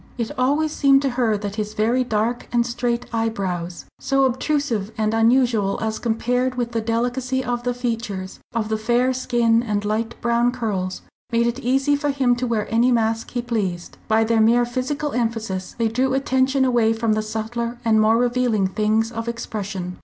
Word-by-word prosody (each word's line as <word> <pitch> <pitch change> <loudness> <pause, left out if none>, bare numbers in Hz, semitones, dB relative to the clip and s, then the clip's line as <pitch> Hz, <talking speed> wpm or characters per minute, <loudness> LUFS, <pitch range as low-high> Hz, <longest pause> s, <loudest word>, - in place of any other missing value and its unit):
It 235 -2 -2
always 290 +5 +1
seemed 275 -2 +4
to 270 - +1
her 240 -4 +1
that 205 0 -5
his 210 0 -3
very 235 +4 +2
dark 230 +1 -1
and 240 -1 +2
straight 240 0 -2
eyebrows, 190 -6 -2
so 275 0 +1
obtrusive 260 -5 -1
and 215 0 0
unusual 225 -3 +3
as 220 -1 -2
compared 245 +2 0
with 240 -1 -2
the 230 -1 -1
delicacy 245 +3 -1
of 245 -1 -1
the 245 0 -2
features, 225 -6 -4
of 220 -2 -2
the 220 0 -1
fair 240 +3 +2
skin 235 -2 +2
and 210 -3 -2
light 225 +2 -2
brown 235 +1 +2
curls, 195 -7 -3 0.3
made 235 0 +2
it 235 +2 -1
easy 270 +3 +2
for 290 0 -1
him 265 -3 +2
to 250 +1 -2
wear 225 -3 0
any 240 +3 +4
mask 225 -1 0
he 245 -1 -3
pleased. 195 -8 -3
By 220 0 +3
their 225 0 +2
mere 235 +2 +4
physical 265 +4 -2
emphasis 225 -6 -2
they 230 -1 +1
drew 260 +4 0
attention 265 0 +2
away 235 -3 +3
from 225 -1 0
the 215 - 0
subtler 225 +2 -4
and 220 -1 +4
more 220 +1 +4
revealing 240 -4 +1
things 215 +3 +1
of 230 0 -5
expression. 200 -6 -5
235 Hz, 185 wpm, -22 LUFS, 220-250 Hz, 0.3 s, seemed